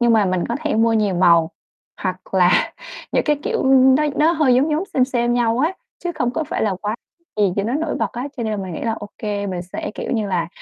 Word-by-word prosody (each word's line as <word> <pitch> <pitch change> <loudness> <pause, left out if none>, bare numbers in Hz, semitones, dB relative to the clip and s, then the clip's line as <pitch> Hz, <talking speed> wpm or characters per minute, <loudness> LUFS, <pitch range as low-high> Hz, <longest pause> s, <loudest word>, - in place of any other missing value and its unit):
nhưng 240 -1 +4
mà 220 -2 +4
mình 185 -1 0
có 235 - -1
thể 310 -2 -1
mua 225 +1 +3
nhiều 210 -4 +1
màu, 170 -2 +4 0.5
hoặc 185 -1 -2
là 180 -1 +3 0.4
những - - +2
cái, 300 -1 +2
kiểu, - - -1
ừm, 265 0 +5
nó 295 - +2
nó 315 +2 +4
hơi 305 -6 +3
giống 275 +5 +2
giống 310 +5 0
xêm 255 - +4
xêm 240 -2 0
nhau 240 -1 +1
á, 315 +7 +2 0.3
chứ 350 - -4
không 245 -4 0
có 315 +6 -2
phải - - -3
là 205 -3 +1
quá 210 +1 -1 0.4
gì 205 -3 +2
cho 200 - +1
nó 230 - -1
nổi 310 +1 -1
bật - - -2
á. 250 +4 -4
Cho 240 - -3
nên 220 -1 -2
là 210 - -1
mình 190 -2 -5
nghĩ - - -5
là 230 - 0
ô 205 -2 -7
kê, 205 -1 -3
mình 180 -2 -3
sẽ, 180 - -6
kiểu - - -5
như 220 -4 0
là, 175 -4 -1
225 Hz, 270 wpm, -20 LUFS, 195-265 Hz, 0.5 s, ừm